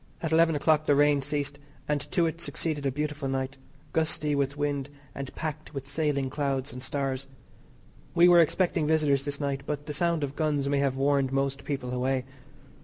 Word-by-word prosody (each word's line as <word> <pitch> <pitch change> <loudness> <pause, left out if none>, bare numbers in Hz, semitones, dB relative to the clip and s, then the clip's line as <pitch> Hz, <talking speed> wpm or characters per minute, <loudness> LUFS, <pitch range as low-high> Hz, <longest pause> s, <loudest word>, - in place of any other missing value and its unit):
At 165 - -1
eleven 165 0 +4
o'clock 155 +1 +2
the 145 - +5
rain 145 0 +4
ceased, 145 +1 -2 0.3
and 150 -1 0
to 170 - +2
it 165 +1 -3
succeeded 155 -4 -1
a - - +1
beautiful 150 0 -3
night, 135 +1 -2 0.4
gusty 155 -2 +2
with 140 0 0
wind, 145 -1 -1 0.2
and 140 -1 -6
packed 155 -1 -5
with 135 -1 -5
sailing 140 -2 0
clouds 135 -2 -2
and 125 - -7
stars. 135 0 -2 0.9
We 175 - +7
were 175 -1 +8
expecting 170 -1 +1
visitors 150 -3 +2
this 145 -1 -2
night, 140 -2 -1
but 145 -1 -3
the 150 - -4
sound 170 0 +1
of 140 0 -3
guns 150 -3 0
may 140 0 +1
have 140 -2 +1
warned 135 -1 +2
most 135 0 -1
people 130 -4 -3
away. 130 +1 0
145 Hz, 185 wpm, -28 LUFS, 135-155 Hz, 0.9 s, were